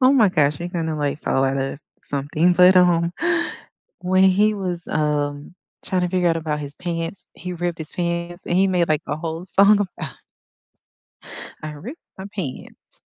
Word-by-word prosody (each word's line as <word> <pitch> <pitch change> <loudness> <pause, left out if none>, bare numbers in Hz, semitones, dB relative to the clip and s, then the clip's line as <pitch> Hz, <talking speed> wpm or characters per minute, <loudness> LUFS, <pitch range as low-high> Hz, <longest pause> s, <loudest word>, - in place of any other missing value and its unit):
Oh 255 +1 +6
my 225 -7 +5
gosh, 150 -4 +2
we're 175 +1 -4
gonna, 165 -3 -2
like, 145 0 -2
fall 135 - +1
outta 135 +1 -1 0.2
something, 150 +5 +1
but, 180 +1 +6
um 175 -1 +4 0.9
when 185 +1 +3
he 205 +3 +4
was, 180 -4 -4
um, 150 +1 -1 0.3
trying 185 -2 0
to 180 - +1
figure 180 -1 +2
out 165 - +2
about 150 -2 -2
his 145 0 -7
pants 170 +1 -4
he 180 0 -6
ripped 175 -1 -3
his 155 - -8
pants, 170 0 -3
and 175 - 0
he 195 +1 +4
made, 180 -3 +1
like, 155 -1 +1
a 145 +2 -2
whole 165 +2 -5
song 200 +2 +5
about 155 -6 -5 1.5
I 155 - -4
ripped 215 - -9 0.2
my 190 - -6
pants. 155 -10 -8
170 Hz, 175 wpm, -22 LUFS, 150-185 Hz, 1.5 s, Oh